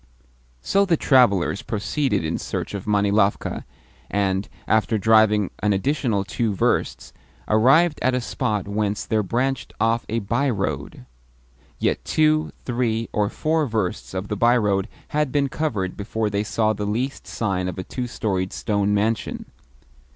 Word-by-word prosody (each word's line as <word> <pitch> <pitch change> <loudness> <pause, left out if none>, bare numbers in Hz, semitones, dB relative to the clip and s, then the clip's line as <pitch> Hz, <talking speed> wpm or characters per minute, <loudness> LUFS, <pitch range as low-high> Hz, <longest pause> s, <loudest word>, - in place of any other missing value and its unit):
So 200 0 +3
the 175 -5 +2
travellers 100 - +3
proceeded 115 - -1
in 80 - -2
search - - -4
of 100 0 -6
Manilovka, 100 0 +1 0.4
and, 100 -1 0 0.2
after 110 0 +2
driving 105 -1 +4
an 105 -1 +2
additional 115 -1 0
two 105 0 -2
versts, - - 0 0.3
arrived 135 +9 +4
at 130 0 +2
a - - +1
spot 105 -4 -2
whence 105 0 -1
there 110 -1 +1
branched 125 +6 -2
off 115 +1 +1
a 115 - -1
by 125 +6 0
road. 75 - -3 0.7
Yet - - 0
two, 155 0 +2
three, 115 -2 -1
or 105 -1 +1
four 155 +3 0
versts 105 -5 -3
of 95 +2 -3
the 105 - -2
by 120 +4 +4
road 100 -3 +1 0.2
had 150 -2 0
been 140 -1 +1
covered 110 -12 -2
before 105 +1 -2
they 100 +1 0
saw 110 0 +1
the 105 0 -4
least 125 +6 -3
sign 95 -5 -2
of 90 - -5
a 95 - -3
two 125 +5 -4
storied 95 -6 -2
stone 105 -1 0
mansion. 110 +2 -1
110 Hz, 150 wpm, -23 LUFS, 100-125 Hz, 0.7 s, driving